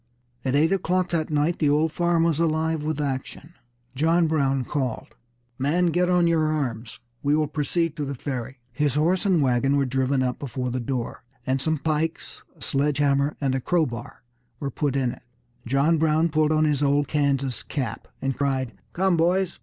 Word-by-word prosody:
At 130 Hz, 0 st, 0 dB
eight 160 Hz, +4 st, +3 dB
o'clock 185 Hz, -1 st, 0 dB
that 160 Hz, -2 st, -1 dB
night 155 Hz, +3 st, +1 dB
the 150 Hz, -, +3 dB
old 150 Hz, +2 st, +2 dB
farm 170 Hz, 0 st, +2 dB
was 165 Hz, -2 st, +1 dB
alive 160 Hz, -1 st, +1 dB
with 155 Hz, 0 st, -2 dB
action. 140 Hz, +3 st, -4 dB, 0.4 s
John 165 Hz, +5 st, +3 dB
Brown 135 Hz, -5 st, +1 dB
called: 130 Hz, -5 st, -3 dB, 0.5 s
"Men, 165 Hz, +6 st, +2 dB
get 180 Hz, +2 st, +2 dB
on 180 Hz, -1 st, +4 dB
your 165 Hz, -2 st, +2 dB
arms; 125 Hz, -7 st, -3 dB, 0.2 s
we 145 Hz, +1 st, +2 dB
will 155 Hz, 0 st, +2 dB
proceed 155 Hz, +2 st, -1 dB
to 150 Hz, -, -2 dB
the 140 Hz, 0 st, -4 dB
Ferry." 130 Hz, 0 st, -5 dB
His 145 Hz, +1 st, 0 dB
horse 175 Hz, +7 st, +2 dB
and 175 Hz, -6 st, +3 dB
wagon 135 Hz, +2 st, +2 dB
were 140 Hz, -, +2 dB
driven 130 Hz, +1 st, +1 dB
up 125 Hz, -1 st, -2 dB
before 125 Hz, -2 st, -3 dB
the 130 Hz, -, -2 dB
door, 120 Hz, 0 st, -4 dB, 0.2 s
and 130 Hz, 0 st, 0 dB
some 160 Hz, +2 st, 0 dB
pikes, 155 Hz, +2 st, -2 dB, 0.2 s
a -, -, -10 dB
sledge 140 Hz, +1 st, 0 dB
hammer, 140 Hz, 0 st, +1 dB
and 135 Hz, -3 st, 0 dB
a 130 Hz, -, -1 dB
crowbar 155 Hz, -7 st, -2 dB, 0.4 s
were 140 Hz, -1 st, -3 dB
put 140 Hz, +1 st, -1 dB
in 130 Hz, -3 st, +1 dB
it. -, -, -11 dB, 0.5 s
John 140 Hz, +6 st, +2 dB
Brown 160 Hz, +1 st, +2 dB
pulled 155 Hz, 0 st, +2 dB
on 155 Hz, 0 st, +3 dB
his 150 Hz, -2 st, +1 dB
old 145 Hz, 0 st, +2 dB
Kansas 140 Hz, -3 st, 0 dB
cap, 130 Hz, -7 st, -4 dB, 0.2 s
and 135 Hz, -1 st, 0 dB
cried: 130 Hz, -2 st, -1 dB, 0.2 s
"Come, 190 Hz, 0 st, +2 dB
boys!" 175 Hz, +2 st, +1 dB
145 Hz, 185 wpm, -24 LUFS, 135-160 Hz, 0.5 s, on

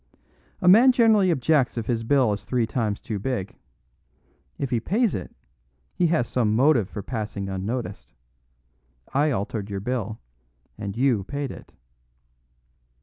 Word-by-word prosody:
A -, -, 0 dB
man 230 Hz, +8 st, +8 dB
generally 220 Hz, -6 st, +4 dB
objects 140 Hz, -4 st, +2 dB
if 115 Hz, -, -2 dB
his 115 Hz, 0 st, -1 dB
bill 125 Hz, -2 st, +2 dB
is 100 Hz, -, -6 dB
three 125 Hz, -3 st, 0 dB
times 110 Hz, -3 st, -2 dB
too 105 Hz, -3 st, -5 dB
big. 105 Hz, -3 st, -4 dB, 1.0 s
If 135 Hz, -, -3 dB
he 120 Hz, -, +2 dB
pays 210 Hz, -, +1 dB
it, 90 Hz, -, -5 dB, 0.6 s
he 175 Hz, -, +2 dB
has 160 Hz, -7 st, +1 dB
some 110 Hz, -4 st, +1 dB
motive 125 Hz, -5 st, +3 dB
for 100 Hz, -, -6 dB
passing 105 Hz, -4 st, -4 dB
unnoticed. 100 Hz, +2 st, -4 dB, 1.0 s
I 145 Hz, +3 st, +3 dB
altered 105 Hz, -4 st, -3 dB
your 100 Hz, -1 st, -3 dB
bill, 110 Hz, -1 st, -3 dB, 0.6 s
and 100 Hz, +1 st, -6 dB
you 125 Hz, -6 st, +2 dB
paid 140 Hz, +3 st, -4 dB
it." -, -, -12 dB
120 Hz, 145 wpm, -24 LUFS, 105-145 Hz, 1.0 s, man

